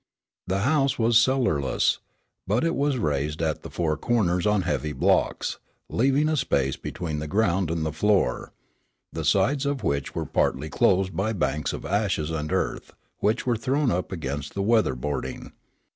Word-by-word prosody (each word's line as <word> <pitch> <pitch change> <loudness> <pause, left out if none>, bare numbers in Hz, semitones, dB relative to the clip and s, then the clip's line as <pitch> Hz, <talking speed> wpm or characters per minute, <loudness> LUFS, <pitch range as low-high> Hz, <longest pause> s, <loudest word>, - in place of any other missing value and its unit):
The 95 +1 0
house 140 +2 +2
was 115 0 +2
cellarless, 115 - +1 0.5
but 105 - +1
it 165 0 +1
was 140 -1 +1
raised 75 - -1
at 80 -2 -1
the - - -8
four 80 -3 -1
corners 90 -6 +1
on 105 -2 +2
heavy 75 -3 -2
blocks, 65 - +1 0.3
leaving 135 +5 +2
a 155 - +1
space 70 - +1
between 80 -4 -5
the 75 - -4
ground 95 -2 +1
and 80 -1 -1
the 80 - -1
floor, 100 +4 +1 0.6
the - - -3
sides 140 0 +2
of 140 -1 -2
which 70 -1 -1
were - - -2
partly 75 +3 0
closed 95 +5 +2
by 110 +4 0
banks 75 -5 -1
of - - -6
ashes 95 -6 0
and 75 -1 -3
earth - - -2 0.3
which 110 +4 +1
were 120 -2 +2
thrown 130 +4 0
up 90 +2 -2
against 75 -4 -4
the 100 - -1
weather 110 - +3
boarding. 65 0 -4
95 Hz, 170 wpm, -25 LUFS, 75-120 Hz, 0.6 s, weather